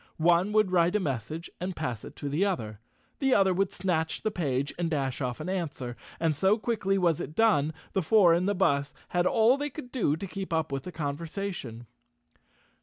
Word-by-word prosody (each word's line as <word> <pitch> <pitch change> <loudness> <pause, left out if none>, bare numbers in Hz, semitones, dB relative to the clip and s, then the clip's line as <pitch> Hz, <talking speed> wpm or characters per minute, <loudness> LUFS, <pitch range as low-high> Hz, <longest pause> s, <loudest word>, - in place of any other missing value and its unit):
One 175 +4 +3
would 215 -3 +3
write 175 +1 +3
a - - +4
message 150 - -3
and 180 +1 -3
pass 120 -3 -3
it - - -10
to 145 - -5
the 150 +7 +1
other. 110 - -2 0.4
The 270 -2 +3
other 190 -2 +4
would 195 +1 0
snatch 160 -4 -1
the 215 - 0
page 140 -7 -1
and 170 -1 0
dash 135 -4 -1
off 125 -2 -2
an - - -5
answer, 150 -10 -3 0.2
and 160 -2 +1
so 190 +8 +3
quickly 210 -4 0
was 170 -5 +2
it 150 - -6
done, 190 -10 +3 0.2
the 190 - +2
four 180 0 +5
in 175 +3 +1
the 205 - +1
bus 145 -6 +1
had 175 0 +2
all 230 +6 +4
they 290 0 -2
could 265 -5 -9
do 210 - +1
to 195 - -5
keep 195 0 -6
up 160 -3 0
with 135 -1 -3
the 180 - -5
conversation. 155 - -5
170 Hz, 205 wpm, -28 LUFS, 145-195 Hz, 0.4 s, four